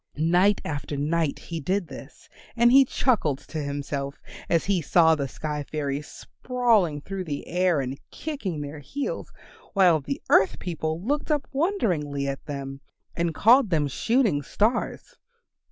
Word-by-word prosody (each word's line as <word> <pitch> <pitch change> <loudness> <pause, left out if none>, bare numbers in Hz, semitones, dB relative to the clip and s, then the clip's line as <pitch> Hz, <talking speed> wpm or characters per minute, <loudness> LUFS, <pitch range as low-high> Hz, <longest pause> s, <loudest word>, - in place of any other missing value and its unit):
Night 180 +6 +3
after 145 -1 -4
night 155 +1 0
he 165 -1 -6
did 185 +4 -1
this, - - -12 0.3
and 235 0 +5
he 270 +1 +7
chuckled 220 - +1
to 155 - -7
himself 140 -1 -4 0.3
as 165 -1 +2
he 195 -3 +1
saw 160 +1 +4
the 140 -3 -1
sky 150 +3 -4
fairies 145 0 -3
sprawling 225 - 0
through 195 +3 -5
the 145 -3 -4
air 180 -2 +1
and 135 0 -4
kicking 220 - -4
their 145 +1 -6
heels, 270 - -5 0.4
while 180 -5 +5
the 275 - -4
earth 190 - +5
people 160 -2 -3
looked 290 +8 -1
up 295 -2 0
wonderingly 180 - 0
at 135 0 -4
them 135 -1 -6 0.3
and 170 -1 -1
called 235 +1 +5
them 155 -4 +1
Shooting 220 - +1
Stars. 215 - -1
165 Hz, 150 wpm, -25 LUFS, 145-210 Hz, 0.4 s, he